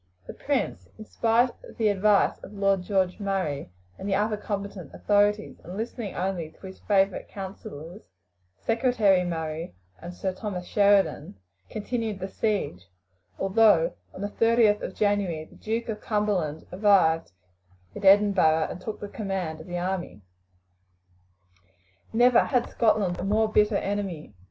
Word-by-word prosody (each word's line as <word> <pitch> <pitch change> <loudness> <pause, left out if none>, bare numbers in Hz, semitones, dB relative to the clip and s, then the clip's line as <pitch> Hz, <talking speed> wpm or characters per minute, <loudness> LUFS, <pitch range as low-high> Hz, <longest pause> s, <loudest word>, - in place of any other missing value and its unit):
The - - -8
prince, 90 0 -2
in 215 - -9
spite 235 +3 +2
of - - -13
the 220 -3 +2
advice 205 +1 +3
of 200 - -11
Lord 195 -2 +1
George 185 0 0
Murray 190 - -2 0.3
and 200 - -4
the 195 - +2
other 210 +2 +1
competent 200 -6 -6
authorities, 205 +1 +1
and 180 +3 -8
listening 225 -2 -5
only 180 -4 -2
to 175 - -16
his 190 0 -10
favourite 195 -2 +1
councillors, 190 -2 -8 0.6
Secretary 225 - +2
Murray 160 - -4 0.3
and 175 - -7
Sir 185 +1 -3
Thomas 185 -2 -5
Sheridan, 200 - +2 0.3
continued 220 -1 -3
the 190 - -4
siege, 195 - -2 0.5
although 195 -4 +4 0.2
on - - -10
the 205 - -2
30th 225 -1 +3
of 190 - -5
January 200 -7 0
the - - -20
Duke 225 +2 -3
of 215 -2 -4
Cumberland 195 -8 -1
arrived 180 - +3 0.6
in - - -8
Edinburgh 195 -5 +5
and 180 - -8
took 215 +3 -6
the 205 - -4
command 190 -7 -4
of 160 - -13
the 175 0 -4
army. 175 - -4 1.9
Never 240 +2 +5
had 250 -4 +1
Scotland 210 -6 +1
a - - -3
more 215 +2 +1
bitter 210 -1 +3
enemy. 195 - -4
195 Hz, 145 wpm, -26 LUFS, 180-210 Hz, 1.9 s, Edinburgh